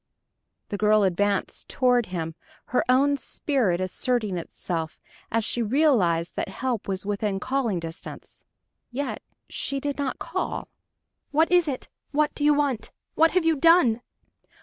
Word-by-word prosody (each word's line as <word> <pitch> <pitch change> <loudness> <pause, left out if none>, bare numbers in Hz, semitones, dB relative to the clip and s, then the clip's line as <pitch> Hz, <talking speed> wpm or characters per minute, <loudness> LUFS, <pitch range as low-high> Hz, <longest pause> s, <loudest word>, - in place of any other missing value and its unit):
The 205 - -3
girl 210 0 +4
advanced 200 +1 0
toward 245 -3 +2
him, 165 -3 -4 0.4
her 250 - +3
own 280 +3 +4
spirit 250 - 0
asserting 210 +2 -1
itself, 165 -1 -4 0.3
as 225 -1 +1
she 240 - -1
realized 215 - +2
that - - -2
help 250 -5 -3
was 190 -1 -3
within 205 -1 -1
calling 250 -5 0
distance. 165 -1 -9 0.5
Yet 275 +3 -3 0.3
she 275 - -3
did 285 +1 -3
not 280 -2 -1
call! - - -3 0.6
"What 320 +4 +2
is 355 -2 +5
it? 265 -3 -3 0.2
What 300 +1 +1
do 290 - -4
you 295 0 +5
want? 280 -6 0 0.2
What 325 +1 +5
have 365 -2 +2
you 325 -1 +4
done?" 290 -7 +5
245 Hz, 145 wpm, -25 LUFS, 195-285 Hz, 0.6 s, is